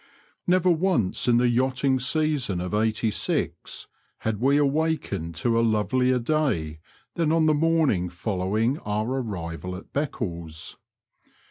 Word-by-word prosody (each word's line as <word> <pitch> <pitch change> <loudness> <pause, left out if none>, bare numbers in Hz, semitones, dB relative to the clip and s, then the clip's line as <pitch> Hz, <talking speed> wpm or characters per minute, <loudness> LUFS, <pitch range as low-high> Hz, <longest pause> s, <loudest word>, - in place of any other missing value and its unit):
Never 180 0 +4
once 160 - +1
in 120 -1 +5
the 125 +1 +3
yachting 130 +2 +1
season 140 - 0
of 90 +2 -4
'86 110 0 -1 0.4
had 110 -2 -1
we 140 +3 +4
awakened 145 - 0
to 115 +8 +1
a - - +4
lovelier 125 +3 +2
day 120 - 0 0.3
than 165 -2 +1
on 165 -1 +3
the 155 - +4
morning 150 - +2
following 105 - -1
our 105 +1 -2
arrival 90 - -5
at 95 - -11
Beccles. 85 - -4
120 Hz, 125 wpm, -25 LUFS, 95-150 Hz, 0.4 s, in